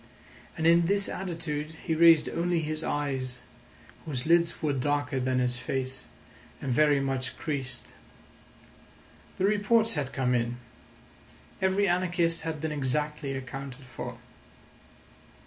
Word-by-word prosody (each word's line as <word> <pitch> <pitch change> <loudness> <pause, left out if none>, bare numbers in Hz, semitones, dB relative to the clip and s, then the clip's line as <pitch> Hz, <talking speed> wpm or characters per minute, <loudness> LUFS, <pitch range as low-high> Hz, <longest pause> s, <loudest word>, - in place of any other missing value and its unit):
And 160 - -1
in 170 0 +5
this 200 +1 +2
attitude 160 -4 -3
he 160 - +1
raised 165 -1 +6
only 175 0 0
his 155 0 -1
eyes, 135 -3 -2 0.7
whose 130 -5 -3
lids 170 +1 +3
were 150 -2 0
darker 145 0 0
than 130 0 0
his 125 -1 +1
face 130 +1 -3 0.5
and 135 - -3
very 145 +2 +4
much 135 -1 -2
creased. 135 -5 -4 1.4
The 185 - +1
reports 220 +2 +3
had 145 -4 -2
come 125 -1 0
in: 120 0 0 1.0
every 190 +2 +3
anarchist 175 -2 +1
had 160 -1 -4
been 160 -1 -2
exactly 150 0 -1
accounted 135 0 -6
for. 125 -1 -7
150 Hz, 125 wpm, -28 LUFS, 130-170 Hz, 1.4 s, raised